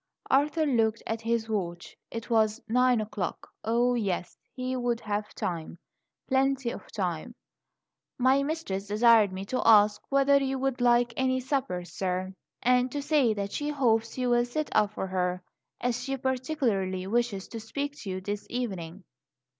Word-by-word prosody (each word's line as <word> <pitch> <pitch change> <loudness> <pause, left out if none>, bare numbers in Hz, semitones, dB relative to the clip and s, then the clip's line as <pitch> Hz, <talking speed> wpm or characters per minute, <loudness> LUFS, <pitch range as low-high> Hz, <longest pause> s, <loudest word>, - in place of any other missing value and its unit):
Arthur 300 +4 +3
looked 230 -5 +1
at 225 0 -3
his 230 0 0
watch; 180 -5 -3
it 230 0 -6
was 220 0 +3
nine 250 +1 +3
o'clock. 205 -4 -4 0.2
Oh, 240 +2 +2
yes! 200 -7 -2 0.2
he 255 0 -3
would 245 -2 0
have 210 0 -3
time 170 -1 -4 0.5
plenty 270 -2 +1
of - - -10
time 185 +3 -3 0.8
"My 260 +2 +4
mistress 275 -10 -3
desired 215 -1 +5
me 190 +1 -5
to 255 +5 -1
ask 210 -2 +6
whether 275 0 +4
you 270 0 -1
would 265 -1 -1
like 240 0 +4
any 260 0 +1
supper, 255 -9 -2
sir; 185 +2 -3 0.3
and 250 +1 +3
to 290 - -2
say 280 -6 +2
that 200 -1 -3
she 295 0 -2
hopes 230 -6 +1
you 250 -1 0
will 240 0 +4
sit 300 +5 -3
up 210 0 +2
for - - -2
her, 180 -1 -1 0.4
as 245 0 -1
she 270 +1 -3
particularly 250 -9 -1
wishes 220 -2 -1
to 230 - -6
speak 280 +6 -4
to 210 - -7
you 185 0 -3
this 205 +2 -4
evening." 195 -7 -4
235 Hz, 160 wpm, -28 LUFS, 200-260 Hz, 0.8 s, ask